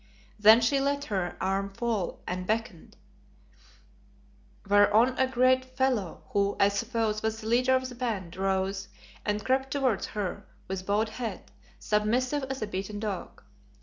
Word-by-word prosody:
Then 220 +3 +8
she 275 +4 +2
let 280 +1 0
her 180 -3 -2
arm 195 +1 -1
fall 225 -6 -2
and 180 0 -4
beckoned, 220 -6 -3 1.7
whereon 205 +4 +5
a 260 0 +1
great 255 0 +3
fellow 255 -8 -1
who, 200 0 +1
I 200 - +5
suppose, 215 +1 -1
was 220 0 -2
the 215 - -10
leader 250 +3 +3
of 260 0 0
the 250 - -9
band, 215 -8 -3
rose 195 +1 -1 0.4
and 210 0 -2
crept 265 +1 +1
towards 260 -7 0
her 205 -4 -4 0.2
with 190 0 -5
bowed 210 +2 +1
head, 220 -3 -6 0.3
submissive 245 +7 0
as 265 -3 -4
a - - 0
beaten 205 +1 -5
dog. 205 -4 -5
215 Hz, 150 wpm, -28 LUFS, 200-255 Hz, 1.7 s, Then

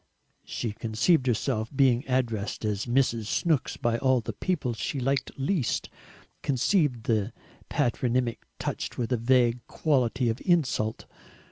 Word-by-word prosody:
She 115 - -3
conceived 115 - +1
herself 115 -1 0
being 130 -2 +4
addressed 115 -5 -1
as 105 +1 -1
Mrs. 120 -3 +1
Snooks 155 +5 0
by 120 -2 0
all 130 0 +3
the 110 - -5
people 150 -10 -1
she 135 +5 -3
liked 135 +2 0
least, 140 - -1 0.5
conceived 140 - +1
the 110 -1 0 0.4
patronymic 120 0 0 0.2
touched - - -4
with 120 -1 -2
a 125 - +3
vague 120 0 +3
quality 130 -4 +1
of 115 +1 -1
insult. 135 - +1
125 Hz, 130 wpm, -27 LUFS, 115-135 Hz, 0.5 s, being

